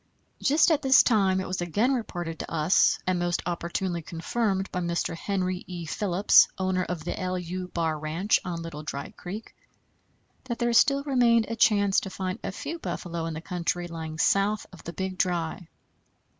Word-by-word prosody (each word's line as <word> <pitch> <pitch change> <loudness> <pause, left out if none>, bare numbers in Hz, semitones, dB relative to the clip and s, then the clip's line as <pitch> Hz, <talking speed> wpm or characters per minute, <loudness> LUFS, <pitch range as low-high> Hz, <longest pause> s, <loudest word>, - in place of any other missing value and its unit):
Just 305 +4 +4
at 305 -2 +2
this 265 +1 +6
time 195 -5 +3
it 190 - -3
was 185 0 -3
again 205 - +1
reported 175 -9 -4
to - - -6
us, 160 +2 +3
and 185 -1 +1
most 175 0 -1
opportunely 175 +1 -2
confirmed 190 +4 -2
by 180 - -2
Mr. 170 -1 -1
Henry 185 0 -2
E. 175 -2 -6
Phillips, 195 +4 +4
owner 185 -1 0
of 175 -3 -4
the 175 - -3
=LU= 185 0 -3
bar 165 -3 -1
ranch 165 +7 +1
on 170 -2 -4
Little 165 -3 -7
Dry 140 -2 -5
Creek, 200 +5 -8 0.9
that 240 -2 -3
there 240 0 +1
still 275 +4 +4
remained 240 -5 +3
a 230 - -2
chance 205 -3 +4
to 195 - -6
find 185 -1 -4
a - - -3
few 330 - -6
buffalo 170 - -4
in 165 - -4
the 160 - -5
country 175 0 -2
lying 160 -2 -6
south 200 +5 +2
of 180 - -13
the 170 - -6
Big 190 0 -4
Dry. 175 -1 -1
185 Hz, 180 wpm, -27 LUFS, 170-205 Hz, 0.9 s, this